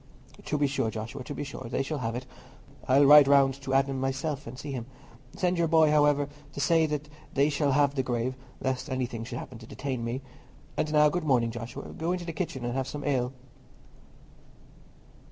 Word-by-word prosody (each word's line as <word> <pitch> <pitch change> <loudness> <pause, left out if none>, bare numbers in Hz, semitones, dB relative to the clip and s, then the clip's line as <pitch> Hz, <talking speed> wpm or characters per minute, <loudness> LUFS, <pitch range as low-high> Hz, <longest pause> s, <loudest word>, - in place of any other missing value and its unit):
"To 150 - -1
be 145 - +2
sure, 135 -5 0
Joshua, 110 +4 -6
to 145 - -6
be - - -3
sure, 140 -3 -7
they 130 +2 0
shall 150 +2 -3
have 115 -2 -2
it. 125 +1 -5 0.6
I'll 135 +2 +6
ride 145 0 +9
round 140 -1 +4
to 135 0 -1
Adam 135 0 +2
myself, 135 +2 -2
and 120 +2 -8
see 145 +1 -6
him. 125 -3 -5 0.5
Send 180 -1 0
your 170 - +3
boy, 160 -1 +5
however, 145 -1 +4 0.3
to - - -6
say 160 +2 +3 0.5
they 140 +2 +4
shall 145 -1 +1
have 140 0 +3
the 135 - 0
grave, 125 0 -1 0.3
lest 130 -1 -2
anything 125 -3 -2
should 120 0 -6
happen 125 -2 -8
to 110 - -12
detain 130 -3 -4
me. 120 +3 -3 0.5
And 155 - -1
now, 150 0 +6
good 175 +2 -2
morning, 125 -6 +2
Joshua; 115 +1 -7
go 165 +2 -1
into 180 -1 -4
the 165 - -4
kitchen 145 -7 -3
and 120 - -2
have 135 0 -1
some 145 +2 -5
ale." 130 -3 0
135 Hz, 200 wpm, -28 LUFS, 125-150 Hz, 0.6 s, ride